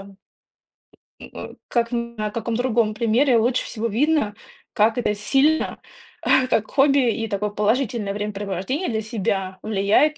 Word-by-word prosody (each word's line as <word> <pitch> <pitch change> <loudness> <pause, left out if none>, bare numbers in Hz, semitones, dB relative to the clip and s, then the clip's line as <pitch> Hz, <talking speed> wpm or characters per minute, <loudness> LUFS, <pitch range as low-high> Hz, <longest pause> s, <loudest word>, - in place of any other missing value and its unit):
м, 195 0 -13 1.2
э, - - -8
как 235 -1 0
на 235 -3 -3
каком 230 +1 -3
другом 235 -3 +1
примере 235 +3 +3
лучше 240 +3 +1
всего 230 0 -3
видно, 245 -1 +1 0.4
как 220 +2 +2
это 225 -4 0
сильно, 275 +9 +1 0.7
как 215 - +1
хобби 275 -3 +3
и 225 0 -3
такое 210 0 -2
положительное 210 0 0
времяпрепровождение 205 - -3
для 220 -1 -1
себя 195 -4 -2
влияет 215 +9 +2
225 Hz, 130 wpm, -22 LUFS, 210-250 Hz, 1.2 s, примере